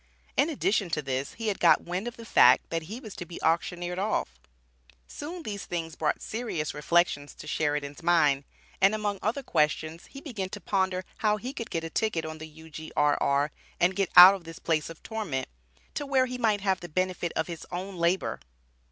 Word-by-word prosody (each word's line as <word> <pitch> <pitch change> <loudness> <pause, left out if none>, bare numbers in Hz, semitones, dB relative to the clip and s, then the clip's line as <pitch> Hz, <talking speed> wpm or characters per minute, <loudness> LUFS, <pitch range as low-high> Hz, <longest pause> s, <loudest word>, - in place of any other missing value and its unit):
In 305 - +3
addition 210 - 0
to 150 - -2
this 135 0 -3
he 225 -1 -3
had 200 - -2
"got 170 - +5
wind 180 +6 -3
of 240 - -6
the 230 - -10
fact," 125 - +5
that 165 0 0
he 205 +10 -7
was 220 -6 -10
to - - -4
be 170 0 -9
auctioneered 175 +2 0
off; 190 - -1 0.7
soon 330 - -7
these 205 -5 -5
things 165 -2 -4
brought 155 -2 -1
serious 220 -10 -3
reflections 150 -1 +1
to - - -11
Sheridan's 145 -1 -2
mind, 155 -5 +3 0.4
and 195 +3 +5
among 205 -2 -2
other 245 +6 -1
questions, 155 - 0
he 275 - -10
began 220 -10 -5
to 205 - -7
ponder 190 0 0
how 210 -1 +2
he 250 +5 -6
could 230 - -6
get 165 - -2
a 165 - -5
ticket 195 -7 0
on 155 0 -6
the 155 - -7
U.G.R.R., 150 -2 0 0.3
and 180 +2 +3
get 195 -2 0
out 180 +2 +12
of 195 -3 -6
this 165 +1 -9
"place 160 -4 -1
of 165 - -11
torment," 200 - -3 0.5
to 290 - -3
where 265 -2 +3
he 250 0 -5
might 215 -4 +2
have 190 -2 +1
the 175 - -9
benefit 180 +1 -1
of 160 - +1
his 170 -2 -8
own 185 +2 -5
labor. 170 +2 0
175 Hz, 200 wpm, -28 LUFS, 160-210 Hz, 0.7 s, out